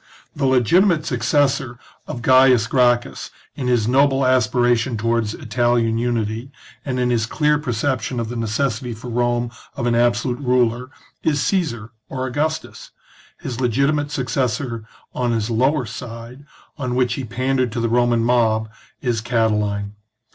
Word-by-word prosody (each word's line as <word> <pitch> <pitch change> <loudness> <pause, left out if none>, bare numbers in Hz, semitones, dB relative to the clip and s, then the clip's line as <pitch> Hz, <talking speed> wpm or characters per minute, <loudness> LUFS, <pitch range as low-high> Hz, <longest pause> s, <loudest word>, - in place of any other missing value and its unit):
The 140 -2 0
legitimate 155 - +3
suc 125 -5 -2
cessor 130 0 +1 0.3
of 120 - -6
Gains 130 -3 +5
Gracchus 120 0 +1 0.2
in 130 - -4
his 120 -3 +2
noble 135 +1 +3
aspiration 120 -1 +2
to 110 - -5
wards 115 -2 0
Italian 120 -2 0
unity, 115 0 -2 0.3
and 130 -3 -2
in 125 0 +1
his 115 -2 +1
clear 150 +3 +1
perception 130 -2 -2
of 115 - -2
the 120 - -6
necessity 120 +1 -2
for 120 +2 -8
Rome 120 0 0 0.2
of 120 - -3
an 120 - +2
absolute 120 +1 +1
ruler, 125 -2 +1 0.3
is 150 -2 +1
Caesar 120 - -1 0.2
or 130 -1 -3
Augustus; 150 +5 -3 0.5
his 130 0 -5
legitimate 140 +4 +1
successor 125 -3 -2 0.3
on 120 -2 0
his 110 0 -1
lower 130 +4 +2
side, 115 +4 -9 0.3
on 125 -3 -2
which 125 -2 +1
he 135 - -4
pandered 130 +1 -1
to 120 - -2
the 115 - 0
Roman 120 0 +2
mob, 110 -2 +2 0.3
is 120 -3 -1
Cati 115 -1 +1
line. 100 -1 -2
120 Hz, 150 wpm, -20 LUFS, 115-130 Hz, 0.5 s, Gains